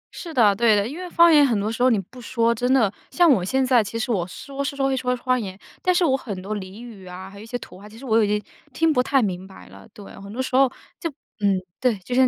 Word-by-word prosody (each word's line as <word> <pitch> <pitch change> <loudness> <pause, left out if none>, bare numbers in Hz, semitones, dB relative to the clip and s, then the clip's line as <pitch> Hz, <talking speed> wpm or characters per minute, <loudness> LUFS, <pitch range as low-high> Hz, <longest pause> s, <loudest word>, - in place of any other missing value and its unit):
是 335 - -7
的， 215 -8 +4
对 225 0 +4
的。 205 +1 +1
因 300 +7 -7
为 365 -1 -6
方 340 -1 +6
言 295 -1 +7
很 230 -6 +1
多 210 +2 -1
时 230 - -5
候 255 - +5
你 225 -5 +2
不 245 +7 -11
说 230 0 +1
真 245 +3 -1
的 225 -7 +4 0.2
像 350 -2 +4
我 195 -9 +3
现 265 +7 +1
在 250 -3 +4
其 220 +3 -5
实 230 +2 -2
我 185 -6 0
说 275 +8 -6
是 280 0 -3
说 275 -1 0
会 265 - +1
说 250 -1 0
方 255 +1 0
言， 190 -2 -7 0.2
但 365 - +2
是 350 -1 +3
我 265 - +3
很 210 -8 -5
多 200 +3 -4
俚 195 +4 -9
语 200 -6 -11
啊， 180 +1 -8
还 200 - -12
有 210 - -10
一 - - -10
些 245 - -3
土 185 - -12
话， 210 - -12
其 220 - -14
实 270 - -11
我 225 -2 +3
已 - - +1
经 210 +1 +1 0.3
听 325 -1 +2
不 250 - +3
太 265 -1 +2
明 185 -2 -3
白 190 - -14
了。 100 +1 -14
对， 205 - -12 0.2
很 200 +1 -10
多 240 - -8
时 260 0 -2
候 270 -1 +5 0.3
就 335 - -2 0.3
嗯， 200 -2 +2 0.2
对， 245 -5 +2
就 215 +7 -7
现 260 +1 +5
235 Hz, 325 characters per minute, -23 LUFS, 200-265 Hz, 0.3 s, 言